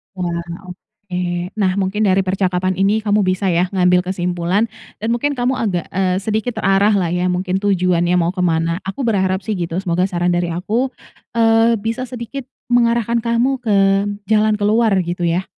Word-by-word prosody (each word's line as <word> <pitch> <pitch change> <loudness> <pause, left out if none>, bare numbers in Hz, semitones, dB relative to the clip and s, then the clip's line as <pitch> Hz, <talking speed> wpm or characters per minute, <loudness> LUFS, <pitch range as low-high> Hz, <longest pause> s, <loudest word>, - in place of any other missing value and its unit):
Wah. 170 -2 -3 0.2
Oke. 180 -2 -5
Nah, 190 -2 +3
mungkin 200 +2 0
dari 190 0 +3
percakapan 185 -1 0
ini 200 +4 +2
kamu 210 0 +2
bisa 185 +1 0
ya 175 +2 +2
ngambil 180 -1 +4
kesimpulan 180 +3 -1 0.3
dan 225 +2 -2
mungkin 285 +4 0
kamu 250 +1 0
agak, 185 -7 -1
eee, 185 -1 0
sedikit 220 +2 -2
terarahlah 195 -2 +2
ya, 180 +1 0
mungkin 185 +1 -1
tujuannya 180 -3 +1
mau 170 +1 +1
ke 185 - -8
mana. 165 +1 0
Aku 230 +8 -4
berharap 190 -5 +1
sih 215 0 -2
gitu. 165 -1 -3
Semoga 180 +1 +1
saran 175 -1 0
dari 175 0 0
aku, 215 +10 -1 0.5
eee, 225 0 +4
bisa 230 +3 -2
sedikit 250 +2 -7 0.2
mengarahkan 235 -1 +2
kamu 240 +3 0
ke 220 -4 0 0.5
jalan 215 0 +3
keluar 215 +2 +2
gitu 175 +1 -4
ya. 175 +3 0
195 Hz, 165 wpm, -18 LUFS, 180-225 Hz, 0.5 s, ngambil